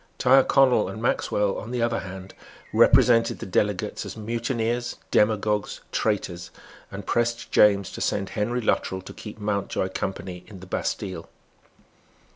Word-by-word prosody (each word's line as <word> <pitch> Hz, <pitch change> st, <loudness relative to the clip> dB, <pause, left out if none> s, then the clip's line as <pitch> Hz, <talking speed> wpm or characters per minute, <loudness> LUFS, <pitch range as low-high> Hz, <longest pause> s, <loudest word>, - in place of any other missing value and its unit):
Tyrconnel 130 Hz, -4 st, +4 dB
and 100 Hz, +3 st, -7 dB
Maxwell, 105 Hz, -3 st, 0 dB
on 110 Hz, -, -8 dB
the 120 Hz, -1 st, -1 dB
other 115 Hz, 0 st, 0 dB
hand, 95 Hz, 0 st, -9 dB, 0.4 s
represented 115 Hz, -2 st, +5 dB
the -, -, -7 dB
delegates 95 Hz, 0 st, -1 dB
as -, -, -8 dB
mutineers, 115 Hz, +2 st, -2 dB, 0.2 s
demagogues, 105 Hz, -1 st, +1 dB
traitors, 90 Hz, -5 st, -2 dB, 0.4 s
and 100 Hz, 0 st, -8 dB
pressed 120 Hz, +2 st, -1 dB
James 100 Hz, -3 st, +4 dB
to -, -, -7 dB
send 100 Hz, -2 st, -1 dB
Henry 120 Hz, +4 st, -1 dB
Luttrell 95 Hz, -4 st, -1 dB
to -, -, -10 dB
keep 105 Hz, -1 st, -9 dB
Mountjoy 100 Hz, -2 st, -2 dB
company 95 Hz, -1 st, -5 dB
in 100 Hz, -4 st, -11 dB
the 95 Hz, -, -11 dB
Bastille. 95 Hz, -1 st, -4 dB
105 Hz, 135 wpm, -25 LUFS, 95-115 Hz, 0.4 s, represented